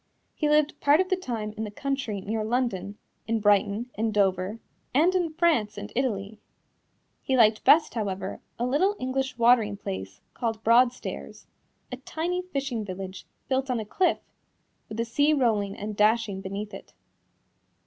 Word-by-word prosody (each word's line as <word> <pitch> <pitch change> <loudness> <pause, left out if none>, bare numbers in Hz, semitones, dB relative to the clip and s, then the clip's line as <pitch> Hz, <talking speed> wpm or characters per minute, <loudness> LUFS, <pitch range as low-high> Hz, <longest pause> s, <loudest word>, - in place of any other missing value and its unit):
He 300 - 0
lived 300 0 +2
part 290 +2 +4
of 370 0 +1
the 375 - +3
time 230 -11 -4
in 220 - -4
the 215 - -4
country 250 -3 -3
near 215 +3 -2
London, 215 -4 -1 0.3
in 225 0 +1
Brighton, 205 +3 +2
in 220 +1 -1
Dover, 195 0 +1 0.4
and 330 +6 +4
in 350 -3 +1
France 300 -12 +2
and 205 +1 -7
Italy. 215 -5 -2 0.8
He 265 - 0
liked 215 -2 +4
best, 315 +1 +5
however, 200 -4 -3 0.2
a 240 - -1
little 360 +11 +2
English 260 0 -2
watering 230 -4 +4
place 95 - -6
called 225 -2 -3
Broadstairs 230 - +1 0.5
a 250 - -4
tiny 335 +7 -3
fishing 275 -10 -3
village, 190 -1 -7 0.2
built 265 0 0
on 250 -2 0
a 220 - -4
cliff, 355 - +1 0.7
with 215 - -7
the 230 - 0
sea 285 +6 +2
rolling 215 -7 +1
and 210 +1 -5
dashing 210 -2 +2
beneath 200 +2 -5
it. - - -10
225 Hz, 160 wpm, -26 LUFS, 205-270 Hz, 0.8 s, best